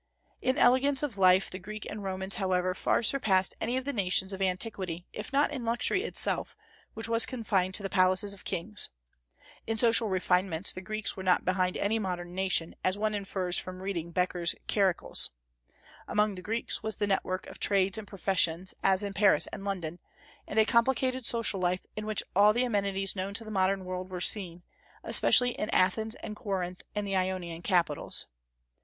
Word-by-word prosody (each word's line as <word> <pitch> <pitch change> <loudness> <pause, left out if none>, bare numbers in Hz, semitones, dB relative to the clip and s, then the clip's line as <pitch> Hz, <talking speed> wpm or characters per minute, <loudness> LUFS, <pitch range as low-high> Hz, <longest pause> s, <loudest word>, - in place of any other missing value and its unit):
In 260 +2 0
elegance 270 +1 +3
of 240 -9 -4
life 185 0 +4
the 185 - -6
Greeks 215 +2 -8
and 210 -1 -7
Romans, 190 0 -3
however, 185 -2 0
far 190 - +1
surpassed 200 -7 +3
any 240 +3 0
of 260 - -3
the 285 - -2
nations 190 -1 +2
of 190 - -6
antiquity, 185 -2 -2
if 210 - -7
not 280 +2 +2
in 270 -5 -5
luxury 240 - +1
itself, 465 - +1 0.4
which 225 +1 -1
was 230 0 +5
confined 195 -7 -1
to 205 - -2
the - - -1
palaces 185 +2 +3
of 200 - -14
kings. 200 +3 -2 0.8
In 225 0 -1
social 230 -1 +4
refinements 185 -1 0
the 185 - -7
Greeks 215 +2 -3
were 190 - -7
not 185 -1 +2
behind 185 0 0
any 220 +3 0
modern 175 -3 -4
nation, 185 -3 0
as 185 +2 0
one 215 +1 -1
infers 190 -3 0
from 185 0 -6
reading 175 -4 -3
Becker's 175 -1 0
Charicles. 195 -4 +1 0.8
Among 210 0 +1
the 185 - -8
Greeks 225 +6 -1
was 220 -1 -3
the 205 - -1
network 190 -2 -1
of - - -12
trades 195 0 +3
and 210 - -10
professions, 185 -2 0
as 190 +1 +3
in 200 -1 -4
Paris 190 -6 +4
and - - -7
London, 180 -4 -4 0.5
and 215 - -6
a 220 - +6
complicated 255 +2 +1
social 230 -4 +3
life 180 0 -1
in 215 0 -5
which 215 -1 +1
all 205 +2 +6
the 240 +3 +1
amenities 200 -4 0
known 195 +1 -4
to 225 - -2
the 215 - -9
modern 190 -1 0
world 185 0 -5
were 185 -1 -5
seen, 180 -2 -2 0.4
especially 250 0 +4
in 215 - -4
Athens 220 +4 +1
and 210 - -6
Corinth 185 -3 -4
and 210 0 -2
the 195 -1 -2
Ionian 185 -3 -2
capitals. 175 -6 0
195 Hz, 185 wpm, -29 LUFS, 185-215 Hz, 0.8 s, a